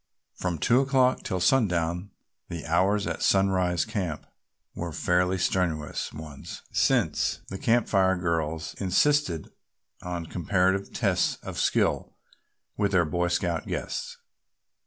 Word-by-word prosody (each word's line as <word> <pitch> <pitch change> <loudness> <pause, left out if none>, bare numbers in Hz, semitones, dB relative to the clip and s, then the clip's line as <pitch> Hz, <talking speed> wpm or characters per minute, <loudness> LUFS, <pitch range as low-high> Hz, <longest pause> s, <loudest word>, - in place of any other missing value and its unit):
From 90 -2 -3
two 120 - +3
o'clock 130 -2 +2
till 95 - -2
sundown 90 -5 +1 0.4
the 85 -2 -6
hours 95 +5 +2
at 85 -2 -3
Sunrise, 95 -3 +2
Camp 85 -7 -3 0.5
were 85 -1 -4
fairly 90 +4 +1
strenuous 90 -5 -1
ones 75 -2 -9
since - - +1
the 95 - -6
Camp 120 +1 +2
Fire 95 -1 +3
girls 80 -2 -2
insisted 95 - +1 0.5
on 90 -2 -4
comparative 95 +3 0
tests - - +1
of - - -5
skill - - +1 0.6
with 100 -1 0
their 85 -2 +4
Boy 85 +3 0
Scout 85 -1 -1
guests. - - -4
90 Hz, 120 wpm, -27 LUFS, 85-95 Hz, 0.6 s, their